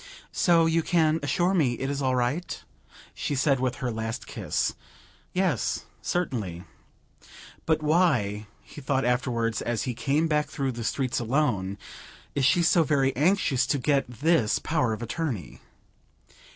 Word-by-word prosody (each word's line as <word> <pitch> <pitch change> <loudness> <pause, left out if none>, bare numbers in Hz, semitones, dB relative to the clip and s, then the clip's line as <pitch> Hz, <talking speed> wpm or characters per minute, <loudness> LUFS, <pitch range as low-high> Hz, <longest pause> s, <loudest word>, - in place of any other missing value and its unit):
"So 170 -2 +4
you 165 0 +2
can 160 -1 +2
assure 175 +7 +1
me 145 -10 +2
it 135 - -3
is 140 0 -2
all 130 -1 +1
right?" 125 +8 -2 0.5
she 145 - -3
said 135 0 +2
with 130 -1 0
her 125 -2 -3
last 110 0 -4
kiss. - - -2 0.6
"Yes, 180 - 0 0.2
certainly." 110 - -2 1.0
"But 155 -1 +2
why," 135 - +2 0.2
he 150 - -11
thought 135 -1 0
afterwards 120 -2 0
as 120 -2 -1
he 125 - -2
came 145 +7 +1
back 150 -1 0
through 135 -1 -2
the 120 -1 -6
streets 130 +2 -1
alone, 115 -6 0 0.6
"is 140 -2 +1
she 160 +6 +4
so 170 0 +4
very 135 -3 +1
anxious 140 -4 +2
to 145 - +1
get 140 -1 +1
this 120 -4 +2
power 130 -1 0
of 110 +2 -4
attorney?" 115 - -4
135 Hz, 150 wpm, -26 LUFS, 120-155 Hz, 1.0 s, So